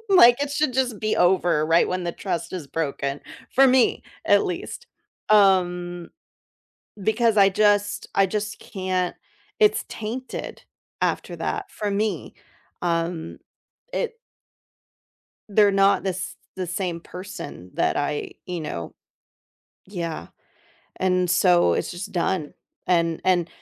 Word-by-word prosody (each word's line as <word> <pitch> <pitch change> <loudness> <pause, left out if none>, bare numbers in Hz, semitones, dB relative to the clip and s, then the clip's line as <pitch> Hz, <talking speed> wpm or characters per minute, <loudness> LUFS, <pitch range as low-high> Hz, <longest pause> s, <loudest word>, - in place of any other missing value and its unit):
Like, 280 -8 +7
it 285 - -2
should 285 -1 +1
just 250 -4 0
be 215 0 0
over 175 -4 +3
right 165 +2 +4
when 185 0 -2
the 170 - -2
trust 170 -3 -4
is 175 -6 -5
broken, 140 -2 -3 0.3
for 270 +1 +7
me 255 -1 +3 0.2
at - - +4
least, 475 - -5 0.4
um 180 -4 +3 0.9
because 220 +1 +2
I 195 -1 +7
just 205 0 +2
I 195 - +5
just 210 +1 -3
can't 185 -2 -2 0.5
it's 425 -1 +4
tainted 235 +4 -6 0.4
after - - -1
that, - - -3
for 210 -1 -3
me. 200 -5 -2 0.5
Um, 165 -1 -2 0.6
it 470 -1 -2 1.3
They're 205 0 +5
not 195 0 +4
the 195 - 0
s 185 +1 -5 0.2
the 185 -1 -4
same 175 -1 -3
person 175 - -9
that - - +1
I, 145 0 -2
you 180 -2 -4
know 85 - -5 0.9
Yeah. 170 - -5 0.7
And 180 -1 +1
so, 175 - +4
it's - - -2
just 185 +4 -7
done, 175 -3 -1 0.3
and 170 -2 +1
and 175 -2 +3
185 Hz, 125 wpm, -24 LUFS, 170-210 Hz, 1.3 s, Like